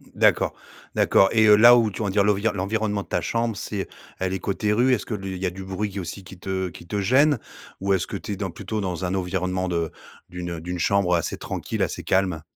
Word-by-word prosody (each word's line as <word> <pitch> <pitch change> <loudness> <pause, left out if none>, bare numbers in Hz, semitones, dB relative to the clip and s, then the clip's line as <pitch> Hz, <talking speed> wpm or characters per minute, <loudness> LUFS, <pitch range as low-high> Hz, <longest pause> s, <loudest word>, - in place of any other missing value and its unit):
D'accord, - - +3 0.4
d'accord 95 - +4
et 110 -1 +4
heu, 105 - +9
là 120 +3 +8
où 115 -3 +3
tu 100 - -6
on - - 0
va 100 - -1
dire 100 +1 +3
l'envir 105 +2 +2
l'environnement 105 +1 -1
de - - -22
ta - - -1
chambre, 115 -1 -1
c'est 100 0 -4 0.3
elle 95 0 -1
est 95 - -2
côté 105 +3 -1
rue? 125 +4 +3
Est-ce 120 -1 -2
li 95 -2 -4
qu'il 95 - -5
y - - +1
a 90 - 0
du 95 +1 -8
bruit, 95 +2 -3
qui 100 - -5
aussi, 95 +2 -6
qui 95 -1 -12
te 95 0 -2
qui 85 0 -13
te 105 - -2
gêne? 135 +7 +4 0.4
Ou 100 0 +2
est-ce 95 - 0
que - - -4
tu - - -7
es - - -1
dans 95 0 -3
plutôt 100 +5 -4
dans 90 -2 -3
un 90 - -1
environnement 95 0 -1
de 85 -3 -1 0.4
d'une, 90 -1 -5
heu, 85 -2 -5
d'une 90 +1 -4
chambre 100 +1 +2
assez 85 - -2
tranquille, - - -3
assez - - -3
calme? 95 -4 +1
95 Hz, 255 wpm, -24 LUFS, 90-105 Hz, 0.4 s, heu